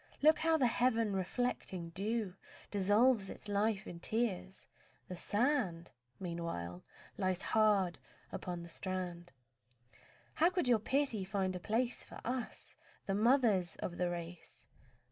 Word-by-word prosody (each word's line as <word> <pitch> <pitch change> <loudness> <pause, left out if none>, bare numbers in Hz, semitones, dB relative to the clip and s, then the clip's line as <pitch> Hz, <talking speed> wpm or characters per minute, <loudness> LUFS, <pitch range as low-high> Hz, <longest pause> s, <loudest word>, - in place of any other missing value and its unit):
Look 310 +1 +7
how 325 0 +3
the 270 - +3
heaven 230 -3 +2
reflecting 190 -3 -2
dew 205 +2 -1 0.4
Dissolves 205 +2 +4
its - - -7
life 205 0 +1
in 170 - -8
tears. 205 -2 -1 0.4
The 180 - -5
sand 205 - 0 0.3
Meanwhile 170 - -4 0.4
lies 185 -1 0
hard 205 -5 +3 0.3
upon 175 -1 -4
the 170 - -9
strand. 175 -1 -4 1.0
How 335 +3 +4
could 360 -6 0
your 240 -3 +5
pity 260 -3 +1
find 190 -1 -1
a - - -3
place 235 +7 0
For - - -10
us, 250 +1 -4 0.3
the 195 - -1
mothers 215 -5 +3
of 175 - -5
the 180 -1 +1
race? 170 0 -7
200 Hz, 130 wpm, -35 LUFS, 180-235 Hz, 1.0 s, Look